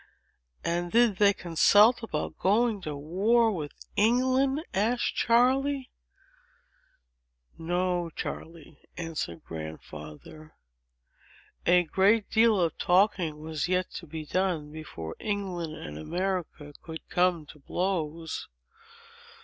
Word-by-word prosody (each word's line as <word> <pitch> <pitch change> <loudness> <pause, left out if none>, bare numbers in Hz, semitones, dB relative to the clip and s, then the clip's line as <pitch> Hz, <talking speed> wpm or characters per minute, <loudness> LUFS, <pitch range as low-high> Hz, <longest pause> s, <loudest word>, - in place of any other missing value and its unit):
"And 175 +1 -1
did 230 -4 +4
they 205 0 +6
consult 205 +6 +4
about 155 -10 -4
going 215 +2 +2
to 155 -4 -5
war 205 +10 +2
with 155 -7 -5 0.2
England?" 255 +6 +2
asked 225 +5 +1
Charley. 265 +3 +2 1.6
"No, 175 +1 -1
Charley," 160 -2 -7 0.2
answered 160 - -4
Grandfather; 80 - -9 1.1
"a 180 0 +6
great 200 +6 +2
deal 220 -2 +4
of 170 -2 +1
talking 180 -4 +2
was 155 0 -3
yet 185 0 0
to 170 - -9
be 155 0 -6
done, 170 -4 -1
before 115 - -7
England 185 -6 -3
and 75 - -8
America 175 - -3
could 160 -1 -9
come 175 -3 +1
to 150 +1 -14
blows. 165 0 -3
180 Hz, 105 wpm, -28 LUFS, 155-210 Hz, 1.6 s, they